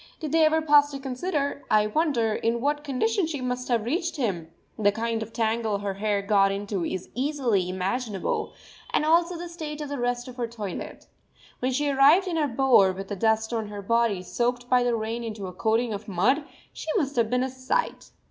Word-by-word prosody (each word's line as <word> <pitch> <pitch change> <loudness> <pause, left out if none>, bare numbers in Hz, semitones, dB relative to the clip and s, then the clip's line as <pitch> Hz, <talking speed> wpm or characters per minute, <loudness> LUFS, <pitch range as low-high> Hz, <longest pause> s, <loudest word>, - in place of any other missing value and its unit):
Did 310 -4 -4
they 325 0 +4
ever 315 +1 +2
pause 290 -1 +5
to 275 -1 -6
consider, 280 +2 -2
I 210 0 +4
wonder, 235 -2 +1
in 230 +2 0
what 290 +3 0
condition 320 - 0
she 305 -3 -4
must 250 0 -3
have 235 -3 +1
reached 335 - -1
him? 190 - -2 0.3
The 205 -1 +4
kind 225 +1 -2
of 220 +1 -6
tangle 225 -2 0
her 200 -1 -3
hair 200 0 -1
got 195 -1 +3
into 200 -2 -3
is 185 +2 -4
easily 250 -9 0
imaginable, 195 +3 -2 0.4
and - - +1
also 340 +2 +3
the 350 +1 -6
state 310 -3 -6
of 295 -2 -5
the 285 -2 -4
rest 245 0 -1
of 250 0 -10
her 240 -1 -1
toilet. 215 -5 -7 0.5
When 255 +1 0
she 290 +3 0
arrived 285 +7 +5
in 340 -2 -1
her 300 -2 +2
bower 240 -6 +4
with 195 +1 -7
the 205 - -3
dust 220 +3 +1
on 220 -2 -2
her 205 -1 -7
body 230 -3 +1
soaked 245 +6 -1
by 250 0 +4
the 245 -1 +1
rain 225 +1 -3
into 215 -3 -5
a 180 - -7
coating 225 +4 0
of 205 +1 -6
mud, 230 - +1 0.3
she - - -9
must 290 -6 -1
have 230 -2 +2
been 250 +1 +1
a 260 - -1
sight! 260 - -2
240 Hz, 210 wpm, -26 LUFS, 215-285 Hz, 0.5 s, pause